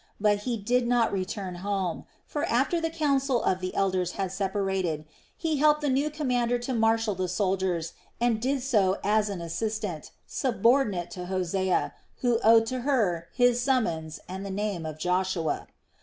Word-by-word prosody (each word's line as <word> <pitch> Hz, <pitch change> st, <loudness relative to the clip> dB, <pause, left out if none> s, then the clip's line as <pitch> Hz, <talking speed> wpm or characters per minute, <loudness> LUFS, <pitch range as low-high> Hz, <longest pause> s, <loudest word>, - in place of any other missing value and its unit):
But 205 Hz, 0 st, +3 dB
he 235 Hz, -, 0 dB
did 240 Hz, +4 st, +1 dB
not 240 Hz, -3 st, +2 dB
return 185 Hz, -1 st, -3 dB
home; 190 Hz, -4 st, -2 dB, 0.2 s
for 295 Hz, -, -3 dB
after 275 Hz, +8 st, +1 dB
the 325 Hz, -, 0 dB
council 275 Hz, -6 st, +1 dB
of 185 Hz, -, +1 dB
the 185 Hz, 0 st, -4 dB
elders 185 Hz, -2 st, +1 dB
had 190 Hz, -2 st, -2 dB
separated, 190 Hz, -5 st, -1 dB, 0.3 s
he 320 Hz, -3 st, -1 dB
helped 300 Hz, +1 st, +4 dB
the 290 Hz, -2 st, +1 dB
new 280 Hz, +3 st, +1 dB
commander 250 Hz, -5 st, 0 dB
to 245 Hz, +2 st, -4 dB
marshal 225 Hz, -1 st, +2 dB
the 185 Hz, 0 st, -2 dB
soldiers 180 Hz, -2 st, -1 dB, 0.3 s
and 235 Hz, -2 st, +1 dB
did 265 Hz, +1 st, 0 dB
so 205 Hz, -8 st, +2 dB
as 210 Hz, +1 st, +2 dB
an 195 Hz, -4 st, -4 dB
assistant, 195 Hz, -1 st, -3 dB, 0.2 s
subordinate 230 Hz, -6 st, +1 dB
to 180 Hz, -4 st, -6 dB
Hosea, 185 Hz, 0 st, 0 dB, 0.3 s
who 240 Hz, -2 st, +2 dB
owed 225 Hz, +1 st, +6 dB
to 255 Hz, +3 st, -3 dB
her 215 Hz, -, +1 dB
his 245 Hz, -1 st, +3 dB
summons 170 Hz, -, 0 dB
and 190 Hz, +2 st, -6 dB
the 200 Hz, -, -5 dB
name 195 Hz, -4 st, -2 dB
of 155 Hz, -1 st, -6 dB
Joshua. 180 Hz, -1 st, -1 dB
210 Hz, 165 wpm, -27 LUFS, 185-245 Hz, 0.3 s, owed